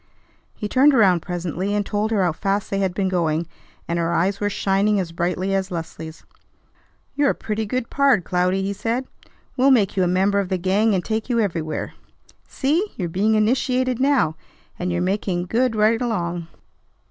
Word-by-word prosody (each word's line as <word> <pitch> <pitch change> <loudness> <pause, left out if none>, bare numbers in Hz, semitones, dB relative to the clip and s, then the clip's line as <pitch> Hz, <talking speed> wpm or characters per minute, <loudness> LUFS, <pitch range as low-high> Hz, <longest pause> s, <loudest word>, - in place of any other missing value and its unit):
He 210 - -4
turned 270 +5 +4
around 190 -7 +5
presently, 180 +3 -3
and 205 -1 0
told 210 +1 -1
her 210 -4 +1
how 175 - +2
fast 195 +4 -2
they 195 - 0
had 190 -2 -1
been 195 -1 0
going; 170 -3 0 0.4
and 170 0 -1
her 170 0 0
eyes 190 +4 +1
were 205 - 0
shining 200 +1 +1
as 175 -3 -3
brightly 180 +3 -1
as 190 -1 0
Leslie's. 160 -2 -7 0.9
"You're 285 0 +2
a - - 0
pretty 215 0 -3
good 250 +2 -3
pard, 275 -9 +3
Cloudy," 180 +2 0
he 200 +1 -2
said. 230 +6 -2 0.5
"We'll 265 +1 +4
make 225 -8 +3
you 190 - +1
a 180 - +3
member 190 +3 +2
of 195 -2 -2
the 185 - 0
gang 195 +4 +2
and 180 - -2
take 220 +2 -2
you 235 -1 +1
everywhere. 165 -7 -2 0.5
See! 325 +10 0
You're 175 -4 -2
being 205 +6 +1
initiated 255 +3 +1
now, 260 - +2 0.4
and 180 0 -2
you're 175 0 0
making 185 -2 -1
good 230 +4 +1
right 220 +2 +3
along. 175 -8 -2
195 Hz, 185 wpm, -22 LUFS, 180-225 Hz, 0.9 s, around